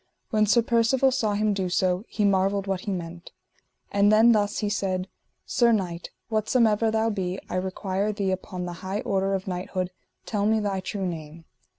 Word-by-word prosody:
When 215 -1 +3
Sir 235 +3 +4
Percivale 235 +3 +3
saw 225 -6 0
him 210 0 +1
do 190 -2 -1
so 185 +2 +1
he 210 - -1
marvelled 195 0 +2
what 195 -2 -1
he 205 - -4
meant. 170 -1 -6 0.6
And 200 +1 +4
then 220 +2 +6
thus 210 -1 +1
he 210 - -1
said: 190 -2 -1 0.4
Sir 240 -2 +3
knight, 180 -6 -1 0.2
whatsomever 220 0 +2
thou 220 +1 +1
be, 190 -2 -2
I - - -2
require 190 +2 -1
thee 200 -2 -1
upon 185 -1 -4
the 175 - -5
high 190 +2 -3
order 195 0 0
of 190 0 -5
knighthood, 185 0 -3 0.3
tell 205 -2 0
me 220 0 +3
thy 200 -2 -1
true 190 +1 -4
name. 165 -1 -6
200 Hz, 185 wpm, -26 LUFS, 185-215 Hz, 0.6 s, then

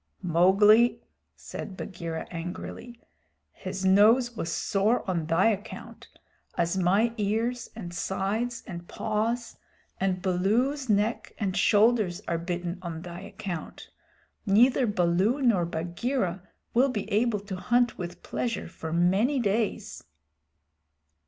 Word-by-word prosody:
"Mowgli," 195 +7 +5 0.4
said 190 - -8
Bagheera 170 -4 -5
angrily, 180 +7 -7 0.5
"his 190 - -5
nose 225 +6 +5
was 170 -6 -3
sore 210 +4 +1
on 170 -4 -1
thy 170 +6 +4
account, 205 -1 -6 0.5
as 170 +1 +1
my 195 +6 +2
ears 225 +4 -1
and 175 -6 -7
sides 205 +7 -2
and 175 -4 -8
paws, 225 +2 -2 0.4
and 190 -1 0
Baloo's 230 +9 +1
neck 210 +3 0
and 195 -4 -2
shoulders 210 -2 +3
are 170 -1 -1
bitten 175 +1 -4
on 165 -2 -6
thy 175 0 -8
account. 185 -3 -7 0.5
Neither 240 +5 +4
Baloo 190 +5 +2
nor 225 -10 +3
Bagheera 175 +4 -2 0.3
will 260 +4 +4
be 215 -6 -3
able 215 0 +1
to 200 -2 -6
hunt 240 +4 +1
with 175 0 -6
pleasure 230 -3 -3
for 160 -1 -7
many 190 - +2
days." 215 -1 -1
200 Hz, 120 wpm, -27 LUFS, 175-230 Hz, 0.5 s, Mowgli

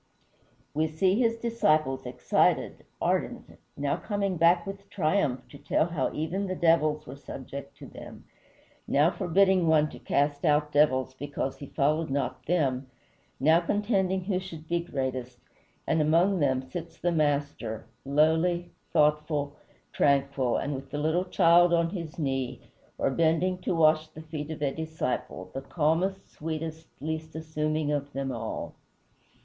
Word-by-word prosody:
We 155 +2 +1
see 185 +7 +1
his 230 -2 +2
disciples 155 - +1
excited, 125 - +1
ardent, - - -2 0.2
now 140 0 0
coming 200 -3 -2
back 170 +1 +4
with 195 0 -8
triumph 155 -9 0
to 140 - -12
tell 145 +2 +1
how 165 -6 -1
even 180 +6 -2
the 185 - -2
devils 155 -3 +2
were 130 - -8
subject 140 0 -8
to - - -10
them, - - -11 0.6
now 150 +5 +4
forbidding 190 -1 +3
one 155 -1 +4
to - - -10
cast 145 0 0
out 150 0 +2
devils 130 -3 +3
because 135 0 -4
he 140 - -9
followed 155 +4 +1
not 130 -2 -2
them, 140 -6 +1 0.5
now 160 +5 +5
contending 190 -1 0
who 185 -1 0
should 165 -4 -9
be 170 +1 +1
greatest; 130 -6 -4 0.5
and 160 - +2
among 170 +5 +3
them 130 -3 +1
sits 165 +6 -7
the 175 - 0
Master, 145 -8 -1 0.2
lowly, 160 +5 +2 0.2
thoughtful, 150 -1 +1 0.4
tranquil, 140 -3 +2 0.2
with 135 0 -7
the 145 - -4
little 160 +5 +1
child 175 -1 +5
on 170 0 +1
his 170 -5 -6
knee, 135 -5 -2 0.4
or - - +1
bending 165 +4 +2
to 180 - -1
wash 155 -1 +4
the 155 0 -11
feet 155 -1 -6
of 155 -2 -5
a 135 -1 +1
disciple, 155 - -4
the 135 - -4
calmest, 170 +7 0
sweetest, 160 +1 -5
least 160 +1 -4
assuming 155 -1 -1
of 145 -1 -2
them 135 0 -2
all. 115 -2 -5
155 Hz, 145 wpm, -28 LUFS, 140-170 Hz, 0.6 s, now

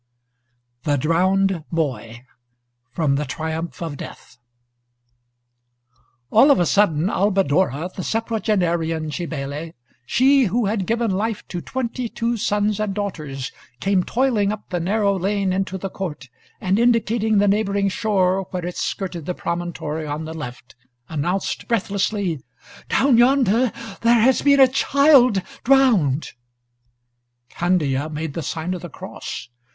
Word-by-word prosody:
THE 145 +2 +1
DROWNED 180 +3 +1
BOY 130 -7 -3 0.6
From 140 +1 0
'The 150 - -2
Triumph 160 +5 -4
of 155 -4 -5
Death' 125 - -11 1.9
All 245 +7 +6
of 280 - +5
a 175 - +3
sudden, 170 -4 +2
Albadora, 190 - +1
the - - -4
septuagenarian 175 -8 -1
Cybele, 155 -1 -5 0.3
she 270 - +4
who 225 +4 0
had 200 -2 -1
given 230 -1 0
life 210 +3 -2
to 175 -2 -4
twenty 250 0 -3
two 235 +1 -1
sons 210 -1 0
and 210 -2 -2
daughters, 155 -10 -4 0.3
came 195 -2 +1
toiling 230 -5 +1
up 210 -1 -7
the 175 - -1
narrow 200 +3 +1
lane 195 0 0
into 190 0 -2
the 190 0 -5
court, 150 -9 -6 0.3
and 190 +3 +1
indicating 230 -2 +2
the 205 +1 +4
neighboring 200 -1 +1
shore, 195 -2 +1
where 180 -2 -4
it 180 - -5
skirted 180 -5 -4
the 180 - -2
promontory 170 -3 -4
on 150 +2 -4
the 160 - -6
left, 125 -5 -8 0.3
announced 175 +5 -2
breathlessly: 200 - -1 0.5
"Down 260 -4 +4
yonder 245 -2 +4 0.3
there 235 0 +4
has 255 +4 +4
been 280 -1 +4
a 265 - +9
child 265 -5 +4 0.2
drowned!" 225 - +3 1.2
Candia 155 -5 0
made 155 -1 -4
the 165 - -3
sign 160 +3 -3
of 180 - -5
the 175 - -7
cross. - - -8
190 Hz, 135 wpm, -21 LUFS, 160-220 Hz, 1.9 s, a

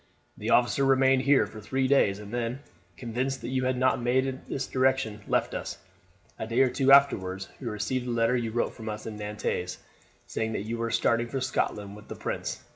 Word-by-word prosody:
The - - -5
officer 125 +3 +3
remained 135 -1 +4
here 140 +1 +4
for 110 - -10
three 130 +5 0
days, 115 -8 +3
and 105 +1 -10
then, 120 +2 -2 0.4
convinced 130 +2 -2
that - - -5
you 130 0 0
had 130 0 +1
not 130 0 +2
made 125 +2 +2
in 130 -1 -4
this 135 - -2
direction, 130 -5 +1
left - - +1
us. - - -4 0.6
A 110 - -3
day 115 +3 +2
or 130 -2 +4
two 135 -1 +2
afterwards 95 -9 +4
we 130 - -6
received 115 +4 -2
the - - -2
letter 115 +1 +2
you 120 -2 -1
wrote 120 +1 0
us 110 -1 -6
from 110 - -6
Nantes, 105 -4 -3 0.5
saying 110 0 -2
that 100 - -2
you 115 +1 -3
were 115 0 -1
starting 115 +1 +2
for 135 +3 -3
Scotland 105 -6 -2
with 105 +1 -13
the - - -7
prince. - - -4
120 Hz, 205 wpm, -28 LUFS, 110-130 Hz, 0.6 s, remained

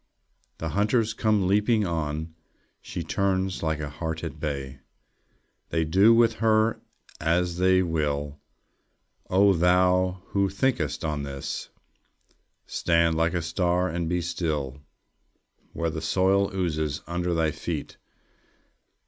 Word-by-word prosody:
The 80 - -4
hunters 105 +4 +1
come 105 -3 +1
leaping 105 +3 +2
on. 80 -1 -3 0.5
She - - -5
turns 95 -1 -1
like 80 -2 -1
a 75 - -3
heart 80 +2 -4
at 80 -2 -6
bay. 70 -3 -4 0.9
They 80 -1 0
do 95 +8 +5
with 115 0 +5
her 110 0 +3 0.4
as 85 +2 0
they 95 0 +4
will.... 75 -3 -2 0.9
O 100 +1 +5
thou 90 +1 +2
who 100 -1 +1
thinkest 100 - -1
on 75 -2 -2
this! 70 -1 -5 1.0
Stand 85 -1 +1
like 85 +2 +1
a 85 - -1
star, 90 +2 0
and 85 0 -2
be 90 0 0
still, 75 -5 -3 0.9
Where 85 -1 -2
the 80 - -5
soil 95 +4 +2
oozes 80 -6 -2
under 85 +1 -2
thy 80 -1 +1
feet. - - -5
85 Hz, 125 wpm, -26 LUFS, 80-95 Hz, 1.0 s, do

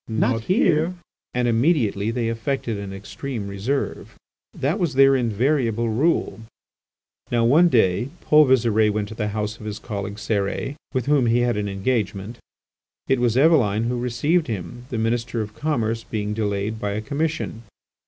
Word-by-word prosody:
not 115 +1 0
here!" 180 - +2 0.4
and 125 0 +1
immediately 115 - +2
they 115 0 -1
affected 115 +1 -2
an 100 -1 -6
extreme 105 +3 -6
reserve. 105 +8 -3 0.4
That 150 +10 -1
was 170 -7 -1
their 135 0 +6
invariable 120 -1 +1
rule. 135 +4 +1 0.9
Now, 120 -1 +2
one 160 +9 +5
day, 110 - +2
Paul 150 -1 +5
Visire 110 -4 +3
went 105 -1 -2
to - - -7
the 105 -1 -2
house 105 +1 -3
of 110 - -8
his 105 0 -4
colleague 100 -2 -5
Cérès, 105 +4 -2 0.2
with 130 -3 -1
whom 140 -4 +3
he 120 +1 +3
had 120 -2 +1
an 105 -1 -2
engagement. 100 +1 -2 0.7
It 135 -1 +2
was 120 -1 +1
Eveline 130 -9 +4
who 120 +1 -1
received 150 +7 +1
him, 120 +3 -6
the 120 - -3
Minister 115 +1 -1
of 105 -1 -4
Commerce 115 -7 -1
being 105 -1 -3
delayed 105 0 -2
by 100 -1 -2
a 105 - -2
commission. 145 -2 -3
115 Hz, 160 wpm, -23 LUFS, 105-135 Hz, 0.9 s, their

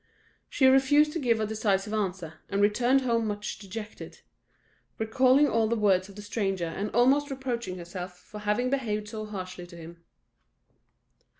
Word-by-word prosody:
She 265 - +2
refused 270 +3 +5
to 335 - -2
give 235 -5 +1
a 215 - 0
decisive 210 -1 -1
answer, 190 -6 -3
and 200 - -1
returned 240 +6 +3
home 230 -3 0
much 205 -1 -4
dejected; 210 +2 -9 0.8
recalling 260 +5 +4
all 225 -3 +2
the 235 - 0
words 200 -3 +2
of 200 - -13
the 205 - -9
stranger, 195 -4 -2
and 195 +6 -4
almost 275 +5 +4
reproaching 240 -8 -4
herself 180 +1 -7
for 210 - -11
having 210 +5 0
behaved 215 -6 -2
so 215 -1 -6
harshly 185 -3 -7
to 170 -1 -13
him. 170 +1 -12
215 Hz, 160 wpm, -28 LUFS, 195-245 Hz, 0.8 s, refused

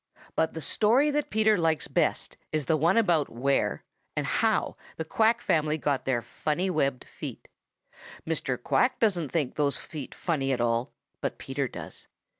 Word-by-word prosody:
But 160 - +1
the 160 - -4
story 235 - +3
that 295 0 -1
Peter 215 -2 +3
likes 160 -2 +1
best - - 0 0.2
is 155 -2 -1
the 160 - +3
one 165 +7 +3
about 175 -10 +3
where 135 +4 0 0.3
and - - 0
how - - +1 0.2
the 160 - -3
Quack 225 +7 +2
family 155 -7 +1
got 145 -3 -1
their 120 -3 0
funny, 165 - -1
webbed 140 -6 0
feet. - - -8 0.8
Mr. 145 -5 -1
Quack 250 - +2
doesn't 180 - +2
think 150 -7 0
those 145 -2 +1
feet 150 -5 -8
funny 140 -6 -1
at 125 - -1
all, 115 +1 +1 0.3
but - - -2
Peter 135 0 -2
does. - - -8
155 Hz, 165 wpm, -28 LUFS, 135-190 Hz, 0.8 s, story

